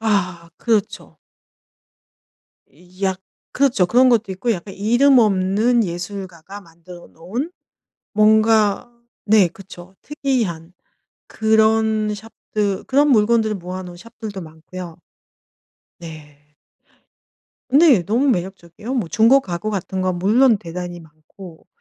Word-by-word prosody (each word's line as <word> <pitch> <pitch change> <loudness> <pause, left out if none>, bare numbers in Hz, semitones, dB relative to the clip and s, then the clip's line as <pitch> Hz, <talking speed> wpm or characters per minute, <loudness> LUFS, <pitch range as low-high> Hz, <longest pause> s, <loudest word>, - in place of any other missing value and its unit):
아. 185 -6 -1
그렇죠. 220 -4 -2 1.8
약 190 -1 -1 0.3
그렇죠. 250 -9 +2
그런 255 +6 +4
것도 225 -5 +1
있고 195 +6 -3
약간 195 0 -7
이름 245 +6 +3
없는 215 +3 +2
예술가가 185 +1 -7
만들어 170 0 -15
놓은 220 - -6 0.6
뭔가 215 +1 +3 0.3
네. 205 -4 +4
그렇죠. 185 0 -14
특이한 225 - -3 0.5
그런 220 0 +1
shop들 210 -2 -4
그런 285 +2 +2
물건들을 220 -2 +2
모아 185 +1 -7
놓은 175 -1 -10
shop들도 215 0 -9
많고요. 165 +1 -10 1.0
네. 155 -3 -12 1.3
네. 280 - +5
너무 235 +9 +1
매력적이에요. 190 +2 -4
뭐 215 -10 -2
중고 230 +8 +4
가구 195 -1 -5
같은 190 -1 -4
건 185 -1 -1
물론 225 +4 +3
대단히 175 0 -7
많고. 160 +2 -15
200 Hz, 245 characters per minute, -20 LUFS, 180-225 Hz, 1.8 s, 네